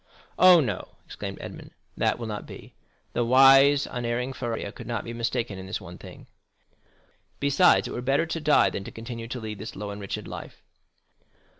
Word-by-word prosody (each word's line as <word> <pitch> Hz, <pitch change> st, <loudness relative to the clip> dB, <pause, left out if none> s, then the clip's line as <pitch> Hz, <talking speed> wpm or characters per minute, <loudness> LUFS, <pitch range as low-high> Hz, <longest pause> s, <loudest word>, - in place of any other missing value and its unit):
Oh, 180 Hz, -1 st, +8 dB
no!" 105 Hz, -9 st, -4 dB
exclaimed -, -, -7 dB
Edmond, -, -, -9 dB, 0.3 s
"that -, -, +1 dB
will 120 Hz, -, -6 dB
not 105 Hz, -2 st, -6 dB
be. -, -, -12 dB, 0.4 s
The 120 Hz, -, +1 dB
wise, 135 Hz, +3 st, +6 dB
unerring 120 Hz, +1 st, -3 dB
Faria 115 Hz, -5 st, -4 dB
could 120 Hz, -, -11 dB
not 115 Hz, -3 st, -3 dB
be 115 Hz, -, -7 dB
mistaken 115 Hz, -3 st, -2 dB
in 95 Hz, -, -8 dB
this 95 Hz, -, -3 dB
one 90 Hz, -3 st, -11 dB
thing. -, -, -12 dB, 1.1 s
Besides, 140 Hz, +6 st, +4 dB
it -, -, -7 dB
were 120 Hz, -, -4 dB
better 135 Hz, +5 st, +1 dB
to 165 Hz, 0 st, -4 dB
die 150 Hz, 0 st, +4 dB
than 100 Hz, -, -5 dB
to -, -, -8 dB
continue 115 Hz, 0 st, -7 dB
to 125 Hz, +1 st, -5 dB
lead 110 Hz, -2 st, -6 dB
this 110 Hz, +3 st, -7 dB
low 105 Hz, +1 st, -5 dB
and 100 Hz, 0 st, -8 dB
wretched 100 Hz, -, -5 dB
life." -, -, -9 dB
120 Hz, 185 wpm, -26 LUFS, 110-135 Hz, 1.1 s, Oh